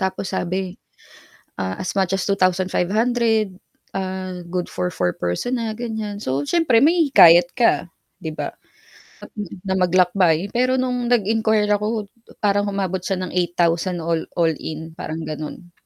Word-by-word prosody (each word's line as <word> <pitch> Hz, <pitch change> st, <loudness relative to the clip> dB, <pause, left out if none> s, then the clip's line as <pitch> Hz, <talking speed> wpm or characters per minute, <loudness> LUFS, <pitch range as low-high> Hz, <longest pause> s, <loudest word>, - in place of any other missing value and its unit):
Tapos 190 Hz, 0 st, -2 dB
sabi, 185 Hz, 0 st, -2 dB, 0.8 s
ah, 95 Hz, 0 st, -4 dB
as 185 Hz, -, -3 dB
much 190 Hz, -2 st, +1 dB
as 195 Hz, -1 st, -1 dB
2,500. 200 Hz, +3 st, +1 dB, 0.4 s
Ah, 185 Hz, -1 st, -4 dB
good 180 Hz, 0 st, -2 dB
for 180 Hz, 0 st, -2 dB
4 90 Hz, -, -1 dB
person 90 Hz, -, -2 dB
na, 230 Hz, -1 st, -2 dB
ganiyan. 220 Hz, -3 st, -4 dB
So, 135 Hz, +2 st, -1 dB
siyempre 315 Hz, -9 st, +3 dB
mahihikayat 265 Hz, -, +6 dB
ka, 230 Hz, -7 st, +2 dB, 0.3 s
'di 160 Hz, -, -3 dB
ba, -, -, -4 dB, 0.7 s
at -, -, -11 dB, 0.4 s
na 190 Hz, -, +1 dB
maglakbay. 180 Hz, -1 st, +3 dB
Pero 255 Hz, +2 st, +2 dB
no'ng 250 Hz, -1 st, -1 dB
nag-inquire 220 Hz, -1 st, +2 dB
ako 210 Hz, 0 st, -2 dB, 0.4 s
parang 205 Hz, 0 st, +2 dB
umabot 190 Hz, -2 st, -1 dB
siya 185 Hz, 0 st, -1 dB
ng 180 Hz, -, -5 dB
8,000 175 Hz, 0 st, +1 dB
all 165 Hz, 0 st, 0 dB
all-in, 160 Hz, -1 st, -2 dB
parang 160 Hz, +1 st, -4 dB
gano'n. 155 Hz, +3 st, -7 dB
190 Hz, 135 wpm, -21 LUFS, 175-220 Hz, 0.8 s, mahihikayat